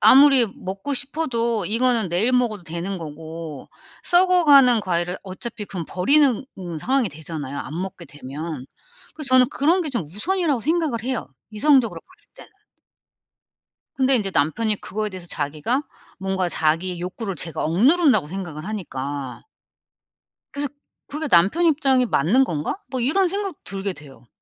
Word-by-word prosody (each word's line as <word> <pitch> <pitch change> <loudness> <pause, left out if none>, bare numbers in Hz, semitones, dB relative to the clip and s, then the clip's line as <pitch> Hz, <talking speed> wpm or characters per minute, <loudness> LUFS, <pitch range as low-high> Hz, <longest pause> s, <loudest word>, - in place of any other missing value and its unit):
아무리 270 -3 +7
먹고 195 +9 -4
싶어도 240 - -1
이거는 230 -1 +2
내일 190 +9 +1
먹어도 235 -6 +1
되는 170 +3 -4
거고 160 -1 -8 0.4
썩어가는 310 - +5
과일을 175 -1 -1
어차피 210 +3 -6
그럼 185 -4 -6
버리는 270 +5 +3
음 175 -4 -6
상황이 255 - +1
되잖아요 150 -3 -6
안 160 +4 -5
먹게 185 -2 -6
되면. 145 0 -7 0.5
그래서 305 -3 -4
저는 255 -1 +6
그런 335 +7 +2
게 310 - -4
좀 240 - -1
우선이라고 280 - -1
생각을 305 -4 0
해요 255 - -2 0.2
이성적으로 255 +2 +2
봤을 - - -20
때는. - - -14 1.5
근데 265 0 +3
이제 200 -4 0
남편이 205 +9 0
그거에 215 +1 -3
대해서 185 -3 -9
자기가 155 - -2 0.4
뭔가 190 -1 -1
자기의 170 +3 0
욕구를 195 +3 -5
제가 165 -2 -4
억누른다고 240 - +4
생각을 170 -4 -6
하니까. 140 -10 -5 1.1
그래서 285 0 -2 0.4
그게 300 +1 -4
남편 195 - +4
입장이 270 -5 +3
맞는 220 - +3
건가? 155 - -3
뭐 260 - -2
이런 355 +10 +2
생각 395 -1 -3
들게 195 0 -3
돼요. 135 -7 -14
210 Hz, 335 characters per minute, -22 LUFS, 170-270 Hz, 1.5 s, 아무리